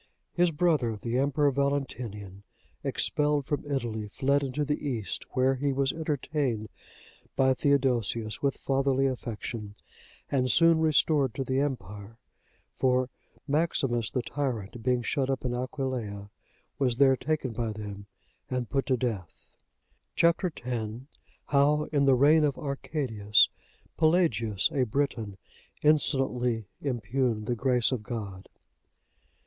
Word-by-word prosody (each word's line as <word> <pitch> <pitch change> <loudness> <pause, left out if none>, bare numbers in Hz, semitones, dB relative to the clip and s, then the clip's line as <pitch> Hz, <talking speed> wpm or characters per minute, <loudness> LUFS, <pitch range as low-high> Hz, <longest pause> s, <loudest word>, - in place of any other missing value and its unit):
His 175 0 +3
brother, 150 -9 +1
the 120 +3 -1
Emperor 140 +1 +2
Valentinian, 125 -8 -3 0.4
expelled 150 -1 0
from 145 0 -3
Italy, 115 -6 -2
fled 140 +7 +1
into 140 +2 -2
the 150 +1 -2
East, 120 -8 -3
where 130 +1 +3
he 140 +2 -1
was 135 0 +1
entertained 145 -8 -2 0.7
by 130 0 +4
Theodosius 125 -6 +1
with 140 -1 0
fatherly 135 0 +1
affection, 115 -4 -4 0.6
and 130 -2 +1
soon 165 +3 +5
restored 150 -4 +3
to 135 - -1
the 130 +1 0
empire, 105 -6 -4 0.6
for 130 -1 +1 0.4
Maximus 135 -7 +1
the 125 - -2
tyrant, 120 -7 -3
being 125 0 +1
shut 135 +1 0
up 135 -1 -2
in 125 - 0
Aquileia, 125 -6 -4 0.5
was 125 -4 +2
there 135 +1 +5
taken 140 -3 -2
by 115 -1 -2
them 100 -1 -7 0.4
and 125 -2 -3
put 135 -1 0
to 130 - +2
death. 110 -9 -4 0.7
Chap. 170 +3 +3
X. 175 -8 -3 0.8
How, 145 +2 +3
in 140 -2 +2
the 135 -1 +5
reign 150 +5 +5
of 145 -3 +1
Arcadius, 130 -7 +1 0.5
Pelagius, 140 - +2
a 140 -4 0
Briton, 120 -5 -1 0.5
insolently 130 -6 +2 0.2
impugned 120 -3 -1
the 120 - 0
Grace 125 0 +2
of 130 -4 -1
God. 105 -5 -6
130 Hz, 125 wpm, -28 LUFS, 115-145 Hz, 0.8 s, soon